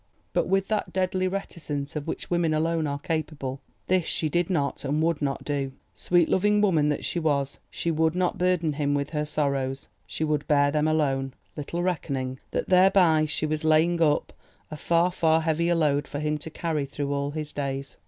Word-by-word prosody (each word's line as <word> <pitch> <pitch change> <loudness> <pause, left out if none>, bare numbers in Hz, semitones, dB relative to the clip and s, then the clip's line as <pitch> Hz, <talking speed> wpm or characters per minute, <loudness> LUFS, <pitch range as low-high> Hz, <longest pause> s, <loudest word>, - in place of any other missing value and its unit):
But, - - +1
with 195 0 +1
that 215 -1 -1
deadly 185 0 0
reticence 155 -7 -4
of 150 0 -4
which 165 - -5
women 170 -3 +2
alone 160 0 0
are 140 0 -2
capable, 145 -3 -3 0.2
this 185 -2 +1
she 155 - -1
did 175 +3 0
not 145 -6 -1
and 145 +2 0
would 165 -2 +1
not 140 -1 -2
do. 140 -2 -2 0.2
Sweet 175 -2 +2
loving 210 +2 +3
woman 165 -8 +3
that 150 - -2
she 175 - -1
was, 140 -4 0
she 170 - -2
would 160 +1 +1
not 180 -1 0
burden 180 -4 +1
him 145 0 0
with 140 0 -2
her 150 -1 -1
sorrows, 140 -3 -2 0.2
she 95 - -3
would 150 -2 -1
bear 145 -1 +4
them 150 +1 +1
alone—little 145 +2 -2
reckoning 135 -7 -2
that - - -2
thereby 180 -4 +5
she 155 +1 -2
was 155 0 -2
laying 160 +2 +3
up 150 -2 +2 0.4
a - - -4
far, 170 +4 +2
far 160 -2 +2
heavier 170 +2 +1
load 145 -3 +1
for - - -5
him 150 0 -1
to 160 - -7
carry 155 -3 -2
through 140 0 -3
all 140 0 -1
his 150 0 -5
days. 135 -1 -4
155 Hz, 190 wpm, -26 LUFS, 145-170 Hz, 0.4 s, thereby